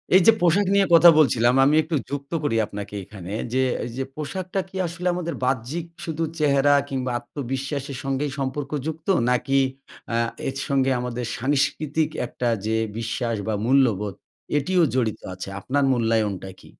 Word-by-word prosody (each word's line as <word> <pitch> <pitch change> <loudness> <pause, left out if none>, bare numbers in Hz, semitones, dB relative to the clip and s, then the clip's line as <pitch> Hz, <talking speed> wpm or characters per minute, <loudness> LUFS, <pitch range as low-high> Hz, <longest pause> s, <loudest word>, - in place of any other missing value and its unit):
এই 190 - +8
যে, - - +11
পোশাক 185 +3 +3
নিয়ে 200 -1 +5
কথা 170 +1 +9
বলছিলাম, 120 -3 +4
আমি 150 - +4
একটু 160 -1 -2
যুক্ত 140 +1 -5
করি 140 -6 0
আপনাকে 100 0 -7
এখানে, 95 -1 -9 0.2
যে, 130 0 +3 0.2
এই 120 - -6
যে, 135 - -1
পোশাকটা 185 +5 -4
কি 190 - -15
আসলে 170 +2 -4
আমাদের 170 -1 -3
বাহ্যিক 130 +6 -1 0.2
শুধু 165 0 -2 0.2
চেহারা, 145 -1 +4 0.2
কিংবা 130 -2 -2
আত্মবিশ্বাসের 135 +2 -4
সঙ্গেই 135 +1 -1
সম্পর্ক 135 +1 -3 0.2
যুক্ত? 160 0 -6 0.2
নাকি 135 +2 +2 0.5
আ - - +1 0.3
এর 135 - -3
সঙ্গে 135 -1 +2
আমাদের 125 0 -3
সাংস্কৃতিক 145 +3 0 0.2
একটা 120 0 -3 0.2
যে, 110 - 0 0.2
বিশ্বাস, 115 +1 -2
বা 110 - 0
মূল্যবোধ 115 -7 +2 0.4
এটিও 175 +4 +2
জড়িত 115 -5 0
আছে? 95 +1 -7
আপনার 140 +7 0
মূল্যায়নটা 110 -5 0
কী? - - -16
135 Hz, 155 wpm, -24 LUFS, 120-155 Hz, 0.5 s, যে